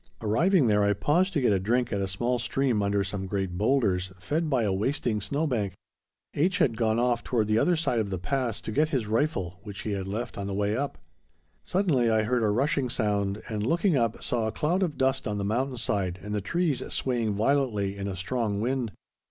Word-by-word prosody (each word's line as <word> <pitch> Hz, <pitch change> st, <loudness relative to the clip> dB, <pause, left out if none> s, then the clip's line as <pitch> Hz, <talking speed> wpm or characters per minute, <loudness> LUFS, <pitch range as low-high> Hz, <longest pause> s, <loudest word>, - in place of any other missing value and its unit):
Arriving 155 Hz, -, +3 dB
there 105 Hz, -2 st, +3 dB
I 100 Hz, 0 st, +3 dB
paused 170 Hz, -, +2 dB
to 150 Hz, -, +1 dB
get 120 Hz, -5 st, +3 dB
a 95 Hz, -, +2 dB
drink 120 Hz, +5 st, 0 dB
at 100 Hz, -, 0 dB
a 95 Hz, -, -1 dB
small 120 Hz, +7 st, -1 dB
stream 130 Hz, -6 st, 0 dB
under 100 Hz, 0 st, +1 dB
some 95 Hz, 0 st, -4 dB
great 95 Hz, -2 st, -2 dB
boulders, 100 Hz, -4 st, +1 dB
fed 155 Hz, -, -1 dB
by 130 Hz, -5 st, +2 dB
a 100 Hz, -3 st, +1 dB
wasting 110 Hz, +1 st, 0 dB
snow 145 Hz, +10 st, -1 dB
bank. 105 Hz, -9 st, -1 dB, 0.6 s
H. 180 Hz, +6 st, +1 dB
had 115 Hz, -5 st, +2 dB
gone 110 Hz, 0 st, +1 dB
off 120 Hz, 0 st, +1 dB
toward 115 Hz, -4 st, +1 dB
the 110 Hz, +1 st, +2 dB
other 175 Hz, +6 st, +3 dB
side 155 Hz, -7 st, 0 dB
of 105 Hz, -2 st, -1 dB
the 95 Hz, -, -2 dB
pass 115 Hz, +5 st, -2 dB
to -, -, -5 dB
get 150 Hz, +7 st, +2 dB
his 130 Hz, -8 st, 0 dB
rifle, 105 Hz, -, -1 dB
which 100 Hz, -1 st, -7 dB
he 105 Hz, -, -3 dB
had 95 Hz, -1 st, -3 dB
left 105 Hz, +2 st, -4 dB
on 100 Hz, -, -3 dB
the 100 Hz, -, -3 dB
way 105 Hz, +1 st, 0 dB
up. 140 Hz, +3 st, -2 dB, 0.7 s
Suddenly 160 Hz, -, +2 dB
I 110 Hz, -1 st, +3 dB
heard 120 Hz, +2 st, +1 dB
a 110 Hz, -, +2 dB
rushing 135 Hz, +4 st, +1 dB
sound, 105 Hz, -4 st, -1 dB
and, 105 Hz, -3 st, -3 dB
looking 170 Hz, -, +2 dB
up, 115 Hz, -4 st, 0 dB
saw 120 Hz, -5 st, 0 dB
a -, -, -1 dB
cloud 170 Hz, -, 0 dB
of 170 Hz, -6 st, -1 dB
dust 135 Hz, 0 st, +1 dB
on 105 Hz, -1 st, -2 dB
the 100 Hz, -, -2 dB
mountain 125 Hz, +5 st, -1 dB
side 100 Hz, -6 st, -1 dB
and 105 Hz, 0 st, -5 dB
the 105 Hz, -, 0 dB
trees 165 Hz, -, 0 dB
swaying 115 Hz, -5 st, -1 dB
violently 110 Hz, -4 st, +1 dB
in 100 Hz, 0 st, -4 dB
a 95 Hz, -, -3 dB
strong 105 Hz, +2 st, -1 dB
wind. 120 Hz, 0 st, -1 dB
115 Hz, 225 wpm, -27 LUFS, 100-135 Hz, 0.7 s, Arriving